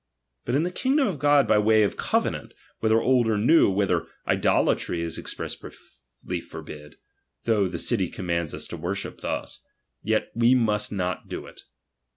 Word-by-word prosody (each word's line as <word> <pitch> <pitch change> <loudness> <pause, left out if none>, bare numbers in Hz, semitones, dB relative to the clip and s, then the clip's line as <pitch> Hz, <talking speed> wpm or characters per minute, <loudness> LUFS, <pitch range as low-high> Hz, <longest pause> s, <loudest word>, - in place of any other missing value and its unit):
But 120 - 0
in 150 - +2
the 180 - -2
kingdom 270 +7 +1
of 170 -8 -3
God 145 -1 +4
by 105 - +4
way 110 0 +4
of 100 - 0
covenant, - - -1 0.2
whether 110 0 +3
old 125 -1 +3
or 110 -1 +1
new, 125 +9 +5
where 100 0 0 0.2
idolatry 85 -1 +1
is 85 -1 -4
expressly 65 -3 -8
forbid, 75 0 -10 0.5
though 105 -4 +2
the 90 -1 -5
city 95 +1 +1
commands 85 -4 -3
us - - -5
to 85 - -6
worship 90 +5 -5
thus, - - -4 0.4
yet - - -1
must 115 -3 +3
we 105 - -5
not 90 -1 -2
do - - -6
it. - - -13
105 Hz, 165 wpm, -25 LUFS, 90-125 Hz, 0.5 s, new